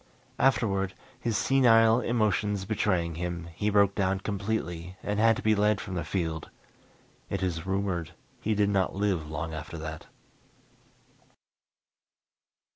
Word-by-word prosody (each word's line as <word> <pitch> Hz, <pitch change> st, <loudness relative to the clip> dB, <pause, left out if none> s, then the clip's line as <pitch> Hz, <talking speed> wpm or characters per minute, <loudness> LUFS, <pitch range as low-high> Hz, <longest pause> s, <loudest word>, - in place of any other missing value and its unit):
Afterward, 100 Hz, -7 st, +2 dB, 0.2 s
his 115 Hz, -4 st, -1 dB
senile 115 Hz, -2 st, +5 dB
emotions 105 Hz, -4 st, 0 dB
betraying 95 Hz, -5 st, 0 dB
him, 85 Hz, -1 st, -4 dB
he 105 Hz, +5 st, -1 dB
broke 100 Hz, -1 st, +4 dB
down 95 Hz, -1 st, 0 dB
completely 95 Hz, -4 st, -3 dB
and 105 Hz, 0 st, -1 dB
had 115 Hz, +1 st, +5 dB
to -, -, -6 dB
be 110 Hz, -, +4 dB
led 105 Hz, 0 st, +2 dB
from 95 Hz, -, -6 dB
the 85 Hz, -2 st, -2 dB
field. 80 Hz, -1 st, -3 dB, 0.8 s
It 95 Hz, -1 st, -2 dB
is 85 Hz, -1 st, -2 dB
rumored 95 Hz, -4 st, -2 dB, 0.2 s
he 110 Hz, 0 st, 0 dB
did 100 Hz, 0 st, +2 dB
not 95 Hz, -2 st, +1 dB
live 95 Hz, -6 st, 0 dB
long 80 Hz, +1 st, -4 dB
after 80 Hz, +2 st, -6 dB
that. 80 Hz, 0 st, -7 dB
100 Hz, 130 wpm, -28 LUFS, 85-105 Hz, 0.8 s, senile